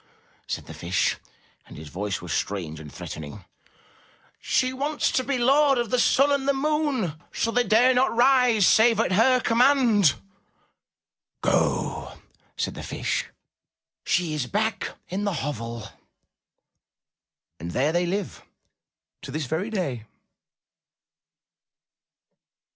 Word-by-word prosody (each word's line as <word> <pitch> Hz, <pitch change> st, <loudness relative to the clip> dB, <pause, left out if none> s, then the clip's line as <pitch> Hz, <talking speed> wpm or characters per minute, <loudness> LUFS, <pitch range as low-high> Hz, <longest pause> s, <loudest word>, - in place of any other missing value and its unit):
said -, -, -4 dB
the -, -, -10 dB
Fish, 85 Hz, +2 st, -1 dB, 0.5 s
and -, -, -12 dB
his 75 Hz, 0 st, -9 dB
voice 100 Hz, +4 st, -4 dB
was -, -, -4 dB
strange 85 Hz, -6 st, -3 dB
and 75 Hz, -2 st, -10 dB
threatening. 75 Hz, 0 st, -8 dB, 1.0 s
''She 255 Hz, 0 st, +1 dB
wants 290 Hz, +3 st, -1 dB
to 260 Hz, -, +1 dB
be 275 Hz, 0 st, -1 dB
Lord 275 Hz, +3 st, +4 dB
of 240 Hz, -3 st, -2 dB
the 250 Hz, -, +2 dB
sun 275 Hz, +3 st, +4 dB
and 280 Hz, -1 st, 0 dB
the 280 Hz, -, +2 dB
moon, 290 Hz, -, 0 dB, 0.2 s
so 230 Hz, -, -1 dB
they 245 Hz, +1 st, +2 dB
dare 240 Hz, +4 st, +4 dB
not 255 Hz, -1 st, +2 dB
rise 245 Hz, -4 st, +4 dB
save 225 Hz, 0 st, +5 dB
at 225 Hz, -, +1 dB
her 250 Hz, +7 st, +4 dB
command!" 235 Hz, -, +4 dB, 1.3 s
''Go!" -, -, 0 dB, 0.4 s
said -, -, -2 dB
the -, -, -8 dB
Fish. -, -, -3 dB, 0.8 s
"She 175 Hz, -3 st, 0 dB
is 145 Hz, -5 st, -2 dB
back 220 Hz, +1 st, -1 dB, 0.2 s
in 190 Hz, +3 st, -3 dB
the 200 Hz, -3 st, -2 dB
hovel." 115 Hz, -5 st, -5 dB, 1.7 s
And 85 Hz, +2 st, -6 dB
there 135 Hz, -, +1 dB
they 175 Hz, +1 st, 0 dB
live 195 Hz, +1 st, -3 dB, 0.8 s
to -, -, -9 dB
this 155 Hz, -1 st, -3 dB
very 160 Hz, -, -2 dB
day. 140 Hz, -, -3 dB
220 Hz, 125 wpm, -25 LUFS, -, 1.7 s, save